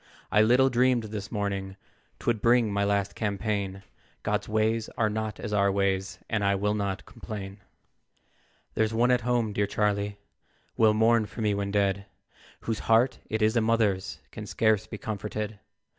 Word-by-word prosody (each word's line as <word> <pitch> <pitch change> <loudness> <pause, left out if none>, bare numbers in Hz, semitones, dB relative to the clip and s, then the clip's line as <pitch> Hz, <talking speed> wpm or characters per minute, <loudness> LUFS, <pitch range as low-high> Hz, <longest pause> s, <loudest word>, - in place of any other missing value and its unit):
I 105 - +5
little 125 +4 +4
dreamed 125 -1 +3
this 105 -2 -6
morning, 100 -2 -3 0.4
Twould 115 -3 -1
bring 115 -3 +3
my 100 0 +1
last 100 -1 0
campaign; 100 -2 -2 0.4
God's 105 0 -1
ways 110 +1 +1
are 110 -2 +2
not 110 -1 -3
as 105 - -4
our 100 -1 +3
ways, 95 -1 0
And 110 -3 -1
I 100 0 +3
will 105 +2 0
not 100 -1 -2
complain. 100 -2 -8 1.1
"There's 110 0 0
one 120 +2 +3
at 125 -1 +3
home, 120 -3 0
dear 100 0 +1
Charlie, 105 0 0 0.6
Will 110 -1 +4
mourn 110 0 +3
for 110 - -8
me 105 -1 +2
when 100 0 -2
dead, 100 -1 0 0.5
Whose 115 -1 -2
heart 115 +3 +4
it 110 0 0
is 110 +2 +3
a 115 - +4
mother's 110 -4 +1
Can - - -8
scarce 110 -1 +2
be 105 - -7
comforted. 105 0 -4
105 Hz, 165 wpm, -27 LUFS, 100-110 Hz, 1.1 s, I